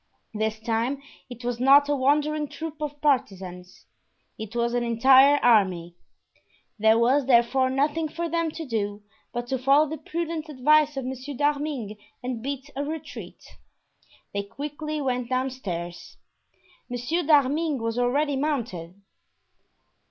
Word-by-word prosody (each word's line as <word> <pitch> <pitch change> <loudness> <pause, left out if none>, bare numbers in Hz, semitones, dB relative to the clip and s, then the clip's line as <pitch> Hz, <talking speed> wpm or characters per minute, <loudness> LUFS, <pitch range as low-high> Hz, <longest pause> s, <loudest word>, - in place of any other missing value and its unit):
This 220 0 -2
time 230 +4 -1 0.3
it 245 -1 -9
was 240 -1 -2
not 280 +3 +6
a 290 - +1
wandering 295 +3 +1
troop 320 +1 -7
of 295 -1 -4
partisans; 190 -10 -2 0.5
it 220 +1 -8
was 235 0 0
an 245 0 +1
entire 265 +4 +6
army. 185 -7 +3 0.9
There 220 +1 +5
was 255 +4 +3
therefore 260 +1 +4
nothing 295 +4 0
for 335 +3 -4
them 335 0 0
to 320 +1 -7
do 205 -4 -3 0.3
but 240 0 -4
to 265 - -1
follow 275 +4 +4
the 315 +2 -6
prudent 330 -2 -4
advice 300 +1 +3
of 265 - -3
Monsieur 265 +2 -6
d'Arminges 285 -7 -1 0.2
and 250 -2 -4
beat 280 +2 -5
a 280 - -2
retreat. 310 +1 -7 0.9
They 200 - -1
quickly 295 +8 -5
went 250 -2 -1
downstairs. 215 -10 -4 0.7
Monsieur 245 +8 -1
d'Arminges 295 -1 +2
was 230 +1 -1
already 280 +4 +1
mounted. 225 - -3
265 Hz, 135 wpm, -25 LUFS, 230-295 Hz, 0.9 s, not